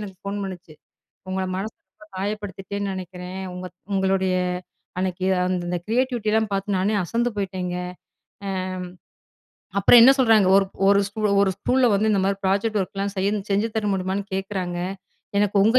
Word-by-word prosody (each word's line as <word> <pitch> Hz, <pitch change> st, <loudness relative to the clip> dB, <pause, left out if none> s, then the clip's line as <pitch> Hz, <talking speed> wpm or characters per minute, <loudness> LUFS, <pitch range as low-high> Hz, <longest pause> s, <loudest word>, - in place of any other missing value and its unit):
எனக்கு 195 Hz, -3 st, -7 dB
ஃபோன் 200 Hz, +1 st, -3 dB
பண்ணுச்சு. 180 Hz, -4 st, -8 dB, 0.6 s
"உங்கள 190 Hz, 0 st, -1 dB
மனச 200 Hz, +4 st, -3 dB, 0.2 s
ரொம்ப 210 Hz, 0 st, -18 dB
காயப்படுத்திட்டேன்னு 200 Hz, 0 st, -3 dB
நெனக்கிறேன். 185 Hz, 0 st, -6 dB
உங்க 180 Hz, 0 st, -6 dB, 0.3 s
உங்களுடைய 190 Hz, -1 st, +2 dB, 0.6 s
அன்னைக்கு 185 Hz, 0 st, -1 dB, 0.2 s
அந்த 180 Hz, -1 st, -1 dB
அந்த 180 Hz, -, 0 dB
கிரியேட்டிவிட்டில்லாம் 220 Hz, -3 st, +1 dB
பார்த்து 195 Hz, 0 st, -1 dB
நானே 205 Hz, +3 st, +1 dB
அசந்து 235 Hz, +6 st, 0 dB
போய்ட்டேங்க." 185 Hz, -2 st, -2 dB, 0.7 s
அம் 190 Hz, -1 st, -2 dB, 1.1 s
அப்பறம் 215 Hz, +4 st, +8 dB
என்ன 265 Hz, +3 st, +9 dB
சொல்றாங்க 225 Hz, -6 st, +5 dB
ஒரு 195 Hz, -, +5 dB, 0.2 s
ஒரு 200 Hz, 0 st, +6 dB
ஸ்கூ 205 Hz, +2 st, -7 dB, 0.2 s
"ஒரு 195 Hz, -, +3 dB
ஸ்கூல 250 Hz, +4 st, +3 dB
வந்து 215 Hz, +2 st, +2 dB
இந்த 200 Hz, -, +2 dB
மாரி 195 Hz, 0 st, +1 dB
ப்ராஜெக்ட் 205 Hz, +3 st, +1 dB
ஒர்க்லா 195 Hz, +1 st, -3 dB
செய்ய 195 Hz, +2 st, +2 dB, 0.2 s
செஞ்சு 205 Hz, +3 st, +2 dB
தர 215 Hz, -1 st, 0 dB
முடியுமான்னு 190 Hz, +1 st, -2 dB
கேட்கறாங்க. 190 Hz, -2 st, -3 dB, 0.6 s
எனக்கு 205 Hz, 0 st, +1 dB
உங்க 225 Hz, +4 st, +5 dB
195 Hz, 150 wpm, -23 LUFS, 185-210 Hz, 1.1 s, என்ன